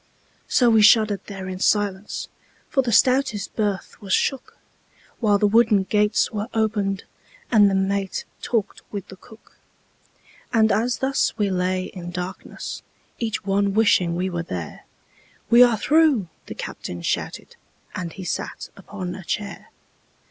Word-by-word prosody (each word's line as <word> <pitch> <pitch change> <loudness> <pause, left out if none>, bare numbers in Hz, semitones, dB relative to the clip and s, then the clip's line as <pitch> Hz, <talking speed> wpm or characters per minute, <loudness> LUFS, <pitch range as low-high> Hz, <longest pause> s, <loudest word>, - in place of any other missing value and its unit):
So 245 -2 +4
we 220 -1 +5
shuddered 210 -2 +5
there 190 -2 -7
in 185 0 -5
silence, 205 0 0 0.4
For 270 - +2
the 245 -2 -2
stoutest 255 -3 +2
berth 205 -3 -2
was 195 -2 -3
shook, 270 -2 -1 0.6
While 210 -3 +3
the 210 - +2
wooden 210 -1 +4
gates 210 +2 +1
were 210 0 -3
opened 205 -3 0 0.5
And 210 -4 +6
the 195 - 0
mate 195 0 -1 0.2
talked 225 -4 -2
with 200 -3 -6
the 190 - -10
cook. 220 +4 -19 0.9
And 220 -1 +4
as 235 +3 +1
thus 265 -3 0
we 205 -3 +1
lay 185 0 0
in 180 -2 -8
darkness, 180 +2 -6 0.4
Each 220 -3 -3
one 200 0 +1
wishing 185 -6 +3
we 180 +2 -1
were 175 -2 -3
there, 90 - -7 0.7
"We 235 +1 +8
are 240 -3 +6
through!" 290 - +3 0.2
the - - -7
captain 85 -1 -6
shouted, - - -3 0.4
And 175 -2 -4
he 190 - -9
sat 180 - -4
upon 190 -2 -7
a 190 - -8
chair. 205 +3 -5
205 Hz, 150 wpm, -23 LUFS, 190-220 Hz, 0.9 s, We